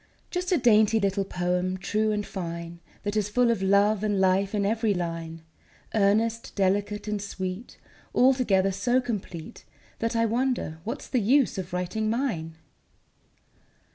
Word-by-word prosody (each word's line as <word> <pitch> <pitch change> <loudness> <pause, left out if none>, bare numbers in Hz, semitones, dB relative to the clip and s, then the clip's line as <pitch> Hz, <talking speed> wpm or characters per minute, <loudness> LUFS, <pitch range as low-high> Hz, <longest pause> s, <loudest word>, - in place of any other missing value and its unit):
Just 360 0 -2
a 360 - +4
dainty 220 -3 +4
little 200 -1 0
poem, 180 0 -1
true 215 +3 0
and 210 -1 -1
fine, 170 -2 -6 0.2
That 205 +1 -2
is 210 -1 0
full 240 +2 +3
of 220 -4 -1
love 200 +2 +3
and 205 -2 +1
life 190 +2 +2
in 200 -1 +1
every 220 0 +1
line, 165 -2 -4 0.5
Earnest, 220 +2 +1
delicate, 205 +2 0
and 210 -1 -2
sweet, 190 +1 -6 0.4
Altogether 245 -7 +3
so 245 +6 +1
complete 200 -9 -6 0.4
That 230 +1 -1
I 230 0 +3
wonder 235 -8 -1
what's 230 - -5
the 250 - 0
use 245 0 +3
of 185 0 -6
writing 180 +5 -2
mine. 215 -10 -2
205 Hz, 145 wpm, -26 LUFS, 185-230 Hz, 0.5 s, a